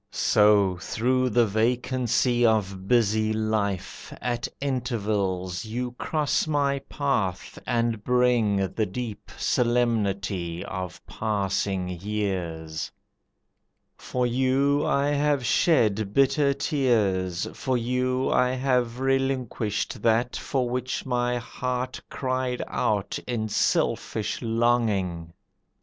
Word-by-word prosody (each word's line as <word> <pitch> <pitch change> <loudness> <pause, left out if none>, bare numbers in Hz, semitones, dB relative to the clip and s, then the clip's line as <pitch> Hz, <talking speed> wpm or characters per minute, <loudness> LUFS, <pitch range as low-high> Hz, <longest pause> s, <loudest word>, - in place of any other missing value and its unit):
So 105 -3 +3
through 130 +8 0
the 120 +1 +4
vacancy 120 +2 +1
of 100 -4 +1
busy 110 -2 +3
life 110 -3 -2
At 120 -1 -2
intervals 105 -9 -1
you 120 +3 -3
cross 150 +3 -1
my 140 -2 +1
path 110 -11 -2
and 115 -3 0
bring 115 -6 +2
The 110 -2 0
deep 110 +2 -6
solemnity 100 -8 0
of 95 -2 -6
passing 100 -3 -1
years. 85 -6 -3 1.0
For 125 -1 -2
you 135 +4 +2
I 140 +1 +2
have 145 -2 +1
shed 110 - +2
bitter 140 +1 +4
tears, 100 - +1
for 130 -2 -1
you 125 +2 0
I 125 0 +3
have 125 -2 0
relinquished 135 -6 -1
that 115 +2 +2
for 130 -3 -1
which 125 +1 -3
my 125 -1 0
heart 125 +1 -4
Cried 130 -1 -2
out 105 +8 -1
in 110 -3 -2
selfish 105 +1 0
longing. 110 -8 0
115 Hz, 100 wpm, -26 LUFS, 100-125 Hz, 1.0 s, the